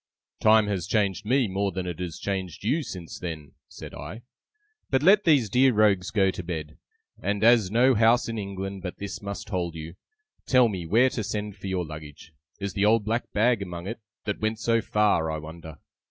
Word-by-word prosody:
'Time 110 Hz, 0 st, +5 dB
has 95 Hz, -4 st, -2 dB
changed 100 Hz, -2 st, 0 dB
me 130 Hz, 0 st, +3 dB
more 100 Hz, +1 st, -1 dB
than 95 Hz, 0 st, -4 dB
it 90 Hz, -2 st, -5 dB
has 90 Hz, -3 st, -5 dB
changed 95 Hz, -3 st, -4 dB
you 145 Hz, +10 st, +1 dB
since 90 Hz, -, -8 dB
then,' 80 Hz, -4 st, -6 dB, 0.2 s
said -, -, -10 dB
I. 115 Hz, +4 st, -8 dB, 0.7 s
'But 135 Hz, +1 st, +1 dB
let 200 Hz, +4 st, +6 dB
these 145 Hz, -9 st, +4 dB
dear 125 Hz, +5 st, +4 dB
rogues 100 Hz, -4 st, +3 dB
go 95 Hz, -3 st, +2 dB
to 90 Hz, -, -6 dB
bed; 80 Hz, -3 st, -6 dB, 0.4 s
and 100 Hz, +1 st, -1 dB
as 115 Hz, -4 st, +5 dB
no 125 Hz, +5 st, +4 dB
house 115 Hz, +2 st, +4 dB
in 115 Hz, -1 st, -3 dB
England 95 Hz, -1 st, -5 dB
but 90 Hz, -1 st, -6 dB
this 100 Hz, 0 st, -6 dB
must 100 Hz, 0 st, -6 dB
hold 90 Hz, -4 st, -2 dB
you, 80 Hz, +1 st, -7 dB, 0.5 s
tell 125 Hz, -3 st, +5 dB
me 90 Hz, -5 st, -5 dB
where 120 Hz, +8 st, +4 dB
to 110 Hz, -, -3 dB
send 105 Hz, 0 st, -4 dB
for 95 Hz, -1 st, -8 dB
your 95 Hz, -2 st, -1 dB
luggage 75 Hz, +1 st, -10 dB, 0.3 s
(is 100 Hz, 0 st, -4 dB
the 100 Hz, -, 0 dB
old 105 Hz, 0 st, +3 dB
black 115 Hz, +3 st, -2 dB
bag 115 Hz, +1 st, +2 dB
among 90 Hz, -2 st, -6 dB
it, 115 Hz, +5 st, -5 dB, 0.3 s
that 105 Hz, -1 st, -3 dB
went 110 Hz, +1 st, 0 dB
so 115 Hz, +1 st, +1 dB
far, 105 Hz, -7 st, +2 dB
I 80 Hz, -, -2 dB
wonder!) 80 Hz, 0 st, -9 dB
100 Hz, 200 wpm, -26 LUFS, 90-115 Hz, 0.7 s, let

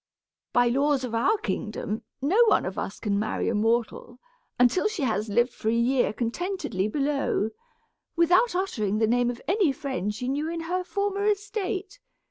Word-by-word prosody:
By 245 Hz, 0 st, +4 dB
the 260 Hz, -, +1 dB
laws 285 Hz, -2 st, +2 dB
of 245 Hz, -3 st, -4 dB
our 315 Hz, -, +2 dB
kingdom, 220 Hz, -, -3 dB, 0.2 s
no 390 Hz, +12 st, +5 dB
one 415 Hz, -, +3 dB
of 185 Hz, -, -4 dB
us 195 Hz, -, -5 dB
can 200 Hz, -2 st, 0 dB
marry 215 Hz, -, -1 dB
a -, -, 0 dB
mortal, 230 Hz, +2 st, 0 dB, 0.4 s
until 250 Hz, -, +4 dB
she 425 Hz, -8 st, -3 dB
has 220 Hz, -3 st, 0 dB
lived 240 Hz, +4 st, +2 dB
for 220 Hz, -, -2 dB
a 225 Hz, -, +2 dB
year 245 Hz, +1 st, +2 dB
contentedly 235 Hz, -, -2 dB
below, 275 Hz, -4 st, 0 dB, 0.6 s
without 360 Hz, +6 st, +4 dB
uttering 215 Hz, -, -1 dB
the 220 Hz, -, +3 dB
name 245 Hz, +2 st, +2 dB
of 240 Hz, -1 st, -6 dB
any 375 Hz, -3 st, +3 dB
friend 265 Hz, -7 st, -3 dB
she 250 Hz, +4 st, -4 dB
knew 290 Hz, +4 st, -1 dB
in 335 Hz, 0 st, -3 dB
her 360 Hz, +3 st, -2 dB
former 400 Hz, +1 st, -1 dB
estate. 410 Hz, -1 st, -2 dB
270 Hz, 175 wpm, -26 LUFS, 230-370 Hz, 0.6 s, no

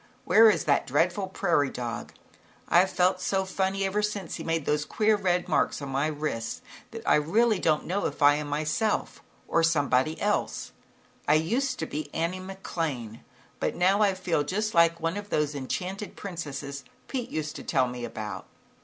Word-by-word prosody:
Where 225 Hz, 0 st, +7 dB
is 210 Hz, -, +1 dB
that 140 Hz, -2 st, +2 dB
dreadful 175 Hz, +8 st, +1 dB
prairie 170 Hz, -7 st, +1 dB
dog? 120 Hz, -2 st, -5 dB, 0.6 s
I've 180 Hz, +2 st, +5 dB
felt 180 Hz, +1 st, +2 dB
so 190 Hz, -1 st, 0 dB
funny 190 Hz, +1 st, -1 dB
ever 200 Hz, +2 st, 0 dB
since 210 Hz, -4 st, -3 dB
he -, -, -5 dB
made 165 Hz, -2 st, -1 dB
those 150 Hz, 0 st, +1 dB
queer 215 Hz, +7 st, +2 dB
red 180 Hz, -3 st, 0 dB
marks 160 Hz, -, +1 dB
on 140 Hz, -2 st, -6 dB
my 135 Hz, +3 st, 0 dB
wrists, 150 Hz, -7 st, -3 dB, 0.3 s
that -, -, -9 dB
I -, -, +6 dB
don't 150 Hz, +1 st, -5 dB
really 225 Hz, 0 st, +3 dB, 0.3 s
know 195 Hz, +3 st, 0 dB
if -, -, -7 dB
I 145 Hz, 0 st, +8 dB
am 150 Hz, 0 st, -2 dB
myself, 155 Hz, +9 st, -1 dB, 0.3 s
or 165 Hz, -, +2 dB
somebody 155 Hz, -2 st, +2 dB
else. 60 Hz, 0 st, -1 dB, 0.6 s
I 150 Hz, -, +5 dB
used 250 Hz, -, 0 dB
to 160 Hz, -, -2 dB
be 150 Hz, -1 st, -5 dB
Annie 170 Hz, +3 st, -1 dB
McLane, 165 Hz, -, -4 dB, 0.4 s
but -, -, -1 dB
now 190 Hz, +4 st, +3 dB
I 200 Hz, -2 st, +3 dB
feel 175 Hz, -5 st, 0 dB
just 210 Hz, +8 st, -1 dB
like 170 Hz, 0 st, +4 dB
one 165 Hz, +4 st, -1 dB
of 205 Hz, 0 st, -7 dB
those 150 Hz, -4 st, 0 dB
enchanted 185 Hz, +9 st, -4 dB
princesses 145 Hz, -7 st, -6 dB, 0.2 s
Pete 250 Hz, -3 st, -3 dB
used 155 Hz, -1 st, -3 dB
to -, -, -8 dB
tell 130 Hz, -, +2 dB
me 125 Hz, 0 st, -6 dB
about." 110 Hz, -3 st, -6 dB
165 Hz, 180 wpm, -27 LUFS, 145-195 Hz, 0.6 s, I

